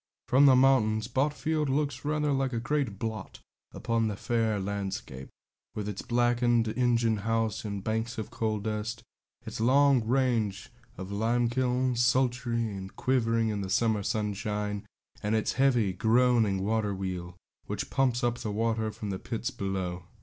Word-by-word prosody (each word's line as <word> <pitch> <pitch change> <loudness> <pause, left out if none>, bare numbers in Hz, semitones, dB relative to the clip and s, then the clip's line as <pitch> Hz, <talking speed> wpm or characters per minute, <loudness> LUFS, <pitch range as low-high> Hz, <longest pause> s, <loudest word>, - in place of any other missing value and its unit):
From 135 +3 +6
the 130 - +7
mountains, 115 -5 +3
Botfield 150 +3 0
looks 140 -2 -1
rather 150 0 0
like 135 -1 0
a 115 - 0
great 120 -4 -1
blot 110 -2 -5 0.3
upon 115 -2 0
the 105 - -2
fair 115 -1 0
landscape, 95 -9 -4 0.5
with 105 -1 -3
its 105 -2 -4
blackened 120 -1 +2
engine 115 -1 +2
house 115 0 -1
and 100 -2 -4
banks 110 +2 -2
of 110 +1 -5
coal 110 -2 -1
dust, 110 +2 -4 0.4
its - - -6
long 135 +1 +4
range 115 -4 0 0.3
of 95 +1 -7
limekilns, 120 +3 +1
sultry 120 -3 +1
and 95 0 -8
quivering 115 -3 +1
in 105 -1 -2
the 95 - -4
summer 110 +1 +2
sunshine, 105 -1 -2 0.3
and 105 +2 0
its 110 - 0
heavy, 120 -7 +2
groaning 110 -2 +3
water 105 -2 0
wheel, 90 -2 -5 0.3
which - - -4
pumps 125 -3 +1
up 120 0 0
the 110 - -4
water 110 +1 0
from 105 -1 -6
the 95 - -4
pits 120 +3 -3
below. 95 -6 -3
115 Hz, 150 wpm, -29 LUFS, 105-125 Hz, 0.5 s, the